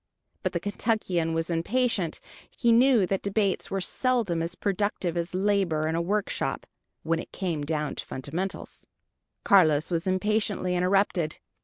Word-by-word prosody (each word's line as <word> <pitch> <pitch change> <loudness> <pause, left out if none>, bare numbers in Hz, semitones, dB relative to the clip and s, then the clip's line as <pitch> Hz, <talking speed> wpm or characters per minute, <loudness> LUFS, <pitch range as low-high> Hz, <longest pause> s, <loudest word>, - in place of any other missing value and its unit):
But - - -2
the - - 0
Kentuckian 190 -6 -1
was 165 +1 -1
impatient: 190 0 0 0.3
he 235 -2 +1
knew 240 -3 +5
that 195 +1 -1
debates 200 -1 0
were 195 - -1
seldom 215 -4 0
as 170 +2 -3
productive 200 -3 -1
as 170 +1 -2
labor 185 -6 +1
in 160 - -1
a 165 - 0
workshop, 205 +4 -1 0.4
when 165 0 0
it - - -8
came 170 -6 -2
down 150 0 -2
to - - -6
fundamentals. 165 +9 -5 0.6
Carlos 155 -5 +4
was 170 +2 -1
impatiently 195 -1 0
interrupted. 180 -3 +1
185 Hz, 145 wpm, -27 LUFS, 165-205 Hz, 0.6 s, knew